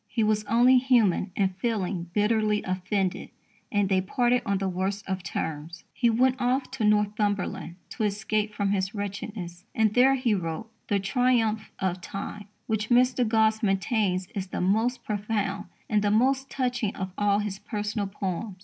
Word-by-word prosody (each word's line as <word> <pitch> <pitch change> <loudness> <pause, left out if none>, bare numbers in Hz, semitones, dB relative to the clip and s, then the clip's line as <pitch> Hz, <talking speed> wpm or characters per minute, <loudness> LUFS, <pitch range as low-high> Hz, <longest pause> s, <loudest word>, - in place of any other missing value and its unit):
He 230 - 0
was 215 0 +2
only 240 +4 +5
human 235 -8 +3
in 195 -2 +2
feeling 190 -3 -2
bitterly 210 +1 +1
offended, 185 0 -2 0.4
and 205 -2 +2
"they 190 -1 +2
parted 245 +5 +1
on 200 0 +2
the 195 0 -1
worst 190 +2 -2
of 190 -1 -2
terms." 160 -1 -5
He 240 - +2
went 255 +3 +2
off 255 +2 0
to 265 -4 -3
Northumberland 210 -4 0
to - - -4
escape 210 +1 -1
from 200 -2 -1
his 195 +1 -1
wretchedness, 200 -3 -5
and 220 -1 +3
there 260 +3 +5
he 250 -4 +1
wrote 175 +3 -3 0.2
The 205 -2 +1
Triumph 220 0 +1
of 185 -1 -2
Time, 200 +3 -6 0.2
which 220 -1 -2
Mr. 250 +1 +4
Gosse 220 0 +3
maintains 195 -2 +1
is 195 -3 -3
"the - - -4
most 220 +7 +1
profound 205 -1 -2 0.2
and 210 -1 +2
the 205 - +1
most 265 +5 +2
touching 245 -5 -1
of 190 -1 -4
all 205 -1 +2
his 205 -2 -3
personal 210 -1 -3
poems." 195 +1 -4
210 Hz, 165 wpm, -27 LUFS, 195-225 Hz, 0.4 s, only